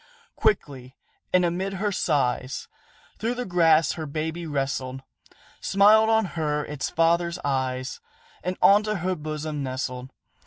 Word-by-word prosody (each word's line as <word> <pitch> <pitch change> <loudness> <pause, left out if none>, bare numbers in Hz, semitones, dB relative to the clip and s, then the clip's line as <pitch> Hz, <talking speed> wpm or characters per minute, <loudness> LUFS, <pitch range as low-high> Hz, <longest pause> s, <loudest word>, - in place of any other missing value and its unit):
Quickly, 135 -11 -1 0.4
and 180 -1 +4
amid 185 +3 -2
her 205 +2 -1
sighs, 135 -7 -1 0.5
Through 235 +3 -1
the 250 0 -3
grass 165 -4 +4
her 160 -2 -5
baby 160 +3 -4
wrestled, 135 -2 -3 0.6
Smiled 215 +3 +5
on 220 -1 +3
her 150 -2 -1
its 150 -2 -4
father's 170 +1 +2
eyes, 130 -1 -2 0.4
And 180 0 -2
unto 210 +2 +5
her 185 0 -1
bosom 155 -1 -4
nestled. 130 -1 -4
160 Hz, 125 wpm, -25 LUFS, 135-185 Hz, 0.6 s, Smiled